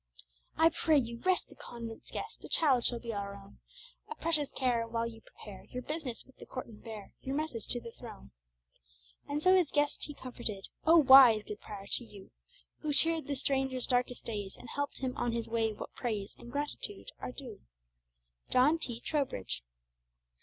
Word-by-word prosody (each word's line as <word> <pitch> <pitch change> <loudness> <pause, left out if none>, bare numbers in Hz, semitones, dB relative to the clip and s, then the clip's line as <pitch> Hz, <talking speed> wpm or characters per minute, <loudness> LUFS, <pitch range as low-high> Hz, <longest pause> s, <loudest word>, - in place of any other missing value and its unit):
"I 325 0 +7
pray 320 -1 +3
you 235 -3 -1
rest 370 +4 +2
the - - -16
convent's 230 -1 -8
guest; - - -6
The - - -10
child 270 -7 +4
shall 240 - +4
be 235 -1 -5
our 200 -1 -4
own 200 0 -14 0.5
A 455 - -5
precious 310 -6 +1
care, 240 -3 0
while 230 0 -1
you 225 -1 -7
prepare 205 -3 -12
Your 250 0 -6
business 300 -5 -3
with 265 - -22
the - - -12
court, 255 - -5
and 220 -3 -14
bear 220 -3 -8
Your 270 +1 -3
message 295 -8 -3
to 245 - 0
the 230 -1 -9
throne." 65 - -11 1.0
And 295 +1 -1
so 370 0 +7
his 355 -5 +4
guest 290 -1 +1
he 295 - -7
comforted. 235 -7 -4 0.2
O 330 - +8
wise, 260 -7 +9
good 210 0 -7
prior! 200 -2 -8
to 240 - +2
you, 205 -4 -13 0.5
Who 300 -1 -1
cheered 325 +2 +2
the 285 - -1
stranger's 265 -2 0
darkest 250 -1 0
days, 205 -4 -4
And 240 - -11
helped 285 -1 -3
him 255 -1 -1
on 240 -1 0
his 230 -1 -2
way, 225 -1 +1
what 210 - -8
praise 215 -5 -3
And 240 - -10
gratitude 295 - -3
are - - -4
due! 260 0 -8 0.9
JOHN 285 +6 +4
T. 240 -6 -5
TROWBRIDGE. 100 - -1
250 Hz, 190 wpm, -32 LUFS, 225-290 Hz, 1.0 s, wise